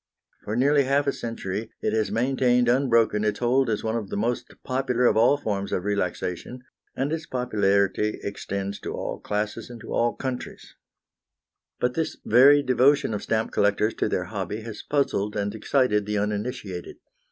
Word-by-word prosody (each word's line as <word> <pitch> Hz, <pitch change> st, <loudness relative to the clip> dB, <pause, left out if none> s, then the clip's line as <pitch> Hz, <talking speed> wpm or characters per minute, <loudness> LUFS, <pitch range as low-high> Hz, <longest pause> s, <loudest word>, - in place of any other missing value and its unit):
For 105 Hz, -, -2 dB
nearly 140 Hz, +3 st, +3 dB
half 140 Hz, +2 st, +2 dB
a 140 Hz, -, +2 dB
century 115 Hz, -2 st, -4 dB
it 105 Hz, -, -1 dB
has 110 Hz, -3 st, +1 dB
maintained 125 Hz, +2 st, +2 dB
unbroken 115 Hz, -4 st, +3 dB
its 105 Hz, -1 st, 0 dB
hold 125 Hz, +1 st, +2 dB
as 105 Hz, -, -1 dB
one 110 Hz, 0 st, -1 dB
of 110 Hz, -4 st, -3 dB
the -, -, -3 dB
most 120 Hz, +4 st, -2 dB
popular 130 Hz, -1 st, 0 dB
of -, -, +4 dB
all 120 Hz, +6 st, +5 dB
forms 100 Hz, -7 st, -3 dB
of 90 Hz, -, -1 dB
relaxation, 100 Hz, +4 st, -3 dB, 0.3 s
and 140 Hz, +4 st, -1 dB
its 160 Hz, 0 st, -4 dB
popularity 105 Hz, -4 st, +1 dB
extends 100 Hz, 0 st, -4 dB
to -, -, -5 dB
all -, -, -4 dB
classes 105 Hz, +2 st, -3 dB
and 120 Hz, -1 st, -9 dB
to -, -, -7 dB
all 120 Hz, 0 st, +1 dB
countries. 130 Hz, -2 st, -6 dB, 1.1 s
But 125 Hz, 0 st, +1 dB
this 160 Hz, +2 st, -2 dB
very 140 Hz, +5 st, +6 dB
devotion 130 Hz, 0 st, +3 dB
of 105 Hz, -, -3 dB
stamp 110 Hz, 0 st, -1 dB
collectors 105 Hz, +2 st, +2 dB
to -, -, +1 dB
their -, -, 0 dB
hobby 105 Hz, +2 st, -4 dB
has 110 Hz, -1 st, -7 dB
puzzled 105 Hz, -8 st, 0 dB
and 100 Hz, -1 st, -1 dB
excited 110 Hz, -2 st, +1 dB
the 105 Hz, 0 st, -1 dB
uninitiated. 105 Hz, -2 st, -3 dB
115 Hz, 170 wpm, -25 LUFS, 105-130 Hz, 1.1 s, very